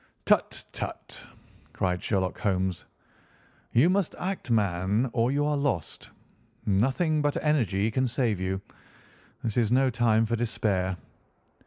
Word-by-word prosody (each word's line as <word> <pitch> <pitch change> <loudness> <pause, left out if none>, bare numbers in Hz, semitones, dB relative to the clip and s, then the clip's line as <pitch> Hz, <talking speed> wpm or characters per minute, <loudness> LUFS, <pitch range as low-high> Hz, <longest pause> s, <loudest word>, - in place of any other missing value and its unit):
"Tut! - - +1
tut!" - - -7 0.5
cried 90 -1 -1
Sherlock 95 -3 -1
Holmes. 95 -4 -1 0.9
"You 125 +8 +5
must 190 -1 +1
act, 185 -6 -4
man, 105 +2 +1
or 120 +1 +2
you 145 +1 +1
are 150 0 +1
lost. 140 - -2 0.6
Nothing 135 - +2
but 145 -1 0
energy 110 - +1
can 130 +3 +1
save 115 -5 0
you. 95 +1 -1 0.8
This 110 -1 -2
is 115 -2 +2
no 130 +1 +3
time 115 -1 +3
for 115 +1 0
despair." 100 -5 -1
115 Hz, 130 wpm, -27 LUFS, 95-135 Hz, 0.9 s, You